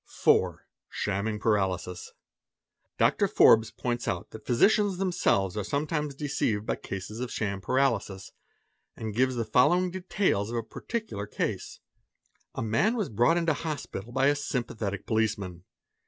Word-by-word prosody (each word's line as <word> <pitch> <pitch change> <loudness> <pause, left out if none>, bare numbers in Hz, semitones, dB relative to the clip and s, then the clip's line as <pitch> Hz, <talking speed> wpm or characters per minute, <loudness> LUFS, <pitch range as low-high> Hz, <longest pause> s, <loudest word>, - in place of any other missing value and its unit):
4. - - +2 0.2
Shamming 105 +2 -2
Paralysis. 95 -4 0
j - - -18 0.9
Dr. - - +3
Forbes 110 0 +6
points 120 0 -3
out - - -3
that 110 - -11
physicians 200 - +3
themselves 175 - +1
are 105 - -2
sometimes 150 - -2
_ - - -29
deceived 135 -8 -1
by - - 0
cases 95 +3 -6
of 125 -1 -4
sham 100 -3 -2
Paralysis, 110 -4 0 0.6
and 110 -2 -5
gives 130 +3 +2
the 115 -2 -1
following 175 +11 +3
details 180 - 0
"A 115 - -6
man 115 - +2
was 215 -6 -1
brought 120 +10 +3
into 165 -2 +2
hospital 145 -8 -5
by 130 +2 +2
a 145 +1 +4
sympathetic 115 -8 -3
policeman. 100 -6 -1
115 Hz, 130 wpm, -28 LUFS, 105-150 Hz, 0.9 s, Forbes